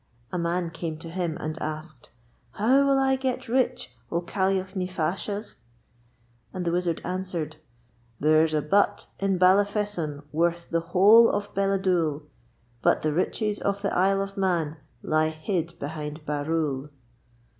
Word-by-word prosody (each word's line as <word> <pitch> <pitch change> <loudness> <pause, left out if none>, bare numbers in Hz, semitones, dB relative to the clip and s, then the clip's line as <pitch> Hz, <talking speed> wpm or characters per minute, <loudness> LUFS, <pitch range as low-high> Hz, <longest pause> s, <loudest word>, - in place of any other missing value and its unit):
A 180 - -2
man 170 0 -1
came 160 -1 -4
to 165 +1 -8
him 175 -3 -2
and 155 +1 -5
asked: 155 -3 -6 0.4
'How 265 +6 +3
will 275 -1 +4
I 265 0 +3
get 260 -1 -2
rich, 245 - 0 0.2
O 170 - +1
Caillagh 190 +2 -1
ny 185 -1 -1
Faashagh?' 185 +5 -3 1.0
And 185 -1 -4
the 170 - +1
Wizard 175 -1 0
answered: 180 -4 -3 0.6
There's 155 +1 +4
a 150 - +1
butt 200 +7 +2
in 195 -1 +1
Ballafesson 185 -5 +2
worth 170 +2 0
the 165 - +2
whole 205 +7 +6
of 205 0 -2
Balladoole. 185 -6 +1 0.6
But - - +2
the 155 -1 +1
riches 205 +5 0
of 200 0 -2
the 200 - 0
Isle 195 +2 +3
of 195 0 -8
Mann 170 -5 0 0.3
lie 155 0 +2
hid 165 +1 -3
behind 150 0 -6
Barrule. 150 -1 -1
175 Hz, 145 wpm, -26 LUFS, 155-195 Hz, 1.0 s, whole